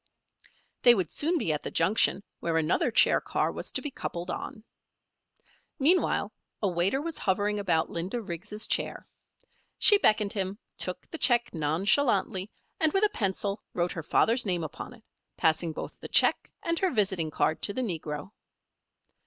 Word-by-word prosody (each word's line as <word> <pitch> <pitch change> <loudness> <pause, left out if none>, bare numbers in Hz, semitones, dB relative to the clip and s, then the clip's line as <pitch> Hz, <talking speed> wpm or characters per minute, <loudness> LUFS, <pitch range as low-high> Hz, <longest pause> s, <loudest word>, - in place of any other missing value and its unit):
They 240 -1 +7
would 185 -6 -2
soon 335 +4 +1
be 165 - 0
at 150 - -3
the - - -4
junction 195 +3 +2 0.2
where 165 -1 -1
another 160 +8 +1
chair 230 - +3
car - - -1
was - - -5
to - - 0
be 295 - -4
coupled 175 -7 -5
on. 220 -5 -7 1.1
Meanwhile 335 +7 +2 0.3
a 205 - 0
waiter 185 +7 +1
was 325 +2 -5
hovering 205 +1 0
about 165 -5 0
Linda 180 +8 -3
Riggs' 210 +2 -4
chair. - - -1 0.7
She 410 -2 +6
beckoned 215 - +2
him, 195 -1 -3 0.2
took - - -3
the 320 - -5
check 240 -2 +3
nonchalantly, 190 - +1 0.3
and 315 -1 +3
with 390 - +2
a 425 - +4
pencil 200 - -2
wrote 175 0 0
her 165 - -5
father's 230 - +2
name 180 -5 0
upon 160 - -8
it, 225 - -22 0.3
passing 160 +1 +1
both - - -8
the - - -7
check - - +3
and 335 0 -1
her 380 - +2
visiting 190 - 0
card 155 +1 0
to - - +4
the 255 - -1
negro. 160 -4 -5
200 Hz, 165 wpm, -28 LUFS, 170-245 Hz, 1.1 s, They